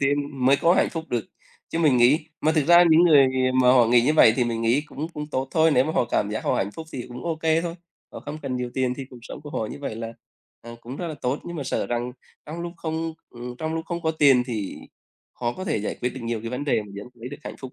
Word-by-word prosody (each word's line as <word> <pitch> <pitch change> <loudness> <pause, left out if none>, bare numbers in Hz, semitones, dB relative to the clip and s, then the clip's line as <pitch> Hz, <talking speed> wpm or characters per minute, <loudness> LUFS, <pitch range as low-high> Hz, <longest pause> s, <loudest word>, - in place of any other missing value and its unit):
tiên 140 -1 -1
mới 135 +2 +6
có 170 +4 +3
hạnh - - +3
phúc 165 -1 -5
được. 120 -4 -1 0.4
Chứ 165 - -3
mình 150 -6 +4
nghĩ 140 +6 +4
mà 155 - +2
thực 155 -3 +2
ra 175 +1 +8
những 160 +2 +6
người, 155 -5 +7
à, 130 0 +1
mà 125 - +4
họ 125 -3 +5
nghĩ 120 +1 +5
như 145 - +3
vậy 115 - +7
thì 125 - +2
mình 115 -1 -2
nghĩ 115 +5 +3
cũng 150 +2 -6
cũng 150 -3 -6
tốt 135 -1 -2
thôi. 160 -1 +4
Nếu 125 - +4
mà 155 - -2
họ 140 - +2
cảm 105 -3 -1
giác 110 - -4
họ - - +1
hạnh 100 - -1
phúc 160 +6 -8
thì 125 -3 -5
cũng 125 0 -9
ô 165 -2 -1
kê 160 0 +2
thôi, 170 -1 -4 0.4
họ - - -8
không 150 +1 -7
cần 130 -3 -3
nhiều 125 -1 -3
tiền 130 -1 0
thì 135 - -5
cuộc 125 - -11
sống - - -9
của 145 - -9
họ 110 - -2
như 145 - -8
vậy 135 -6 -4
là, 115 0 -5 0.5
à, 120 - -10
cũng 125 +3 -8
rất 175 - -4
là 155 - -5
tốt. 130 +4 0
Nhưng 175 0 -6
mà 145 - -4
sợ - - -1
rằng 120 +1 -2 0.3
trong 160 +3 -6
lúc 170 0 -5
không 160 0 -3 0.2
ừm, 120 +1 -8
trong 160 0 -3
lúc 165 0 -3
không 170 -1 -4
có 160 - +1
tiền 140 -5 +5
thì 110 -6 -4 0.6
khó 120 -1 -2
có 185 - -7
thể 190 - 0
giải 105 - -3
quyết 125 - 0
được 130 - -7
nhiều 115 -1 -2
cái 115 +1 -6
vấn 125 +3 -3
đề 140 -6 +1
mà 105 - -13
vẫn 100 +1 -7
không 120 - -24
lấy 125 - -5
được 145 +2 -9
hạnh - - -7
phúc. 130 -2 -9
135 Hz, 300 wpm, -24 LUFS, 120-160 Hz, 0.6 s, ra